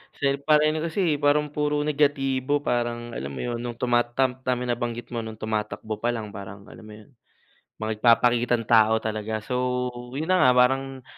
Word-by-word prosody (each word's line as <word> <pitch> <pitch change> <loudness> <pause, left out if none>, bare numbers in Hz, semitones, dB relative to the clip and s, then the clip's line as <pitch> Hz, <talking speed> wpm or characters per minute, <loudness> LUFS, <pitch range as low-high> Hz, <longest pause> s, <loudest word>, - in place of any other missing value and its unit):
Kasi 140 0 0
parang 150 0 +5
ano 155 - -2
kasi, 165 -3 0
parang 150 +1 +2
puro 150 0 0
negatibo, 145 -2 +1
parang 120 -1 -2
alam 70 - -4
mo - - -5
yun, 120 -1 -3
nung 120 -1 -5
tuma 120 0 +2
tama 130 +1 0 0.3
nabanggit 120 -1 -3
mo 120 - -2
nung 110 0 -7
tumatakbo 110 0 -3
palang 115 -2 -2
parang, 100 0 -9
alam - - -13
mo 110 - -11
yun, 110 +5 -16 0.7
mga 110 0 -4
nagpapakitang 120 0 +3
tao 110 -1 +5
talaga. 110 0 -3
So, 125 +1 -1 0.3
yun 160 - -2
na 185 -1 +4
nga, 130 - +6
parang 135 +1 +1
120 Hz, 170 wpm, -25 LUFS, 110-140 Hz, 0.7 s, nga